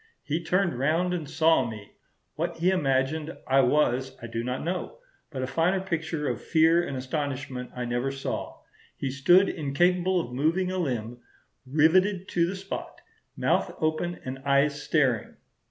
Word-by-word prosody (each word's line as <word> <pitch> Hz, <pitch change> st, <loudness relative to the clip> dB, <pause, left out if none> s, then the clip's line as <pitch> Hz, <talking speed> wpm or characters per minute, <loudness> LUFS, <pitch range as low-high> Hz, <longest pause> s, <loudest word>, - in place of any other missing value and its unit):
"He 160 Hz, +3 st, -2 dB
turned 175 Hz, -6 st, +1 dB
round 165 Hz, +6 st, +1 dB
and 160 Hz, -5 st, -4 dB
saw 160 Hz, -4 st, +3 dB
me. 110 Hz, -4 st, -7 dB, 0.4 s
What -, -, -3 dB
he 175 Hz, +3 st, +2 dB
imagined 150 Hz, -1 st, 0 dB
I 135 Hz, +1 st, +3 dB
was 130 Hz, -1 st, +2 dB
I -, -, -8 dB
do 115 Hz, 0 st, -4 dB
not 125 Hz, +1 st, -3 dB
know; 180 Hz, -, -3 dB, 0.3 s
but 130 Hz, -4 st, -4 dB
a -, -, +1 dB
finer 165 Hz, +8 st, +1 dB
picture 160 Hz, -5 st, -2 dB
of -, -, -2 dB
fear 165 Hz, +1 st, +4 dB
and 140 Hz, -6 st, -4 dB
astonishment 130 Hz, -1 st, -4 dB
I 125 Hz, -1 st, -3 dB
never 120 Hz, +2 st, -1 dB
saw. 135 Hz, 0 st, -5 dB, 0.4 s
He 135 Hz, -, -2 dB
stood 175 Hz, +8 st, +5 dB
incapable 175 Hz, +5 st, +1 dB
of 125 Hz, -7 st, -5 dB
moving 165 Hz, +8 st, +1 dB
a 185 Hz, -, -2 dB
limb, 120 Hz, -6 st, -3 dB, 0.5 s
riveted 180 Hz, +7 st, +3 dB
to 170 Hz, -1 st, +2 dB
the 190 Hz, -, -3 dB
spot, 195 Hz, +1 st, -6 dB, 0.4 s
mouth -, -, +1 dB
open 155 Hz, +2 st, -1 dB
and 130 Hz, +1 st, -5 dB
eyes 140 Hz, +1 st, +2 dB
staring.... 130 Hz, -9 st, +1 dB
150 Hz, 160 wpm, -27 LUFS, 130-175 Hz, 0.5 s, stood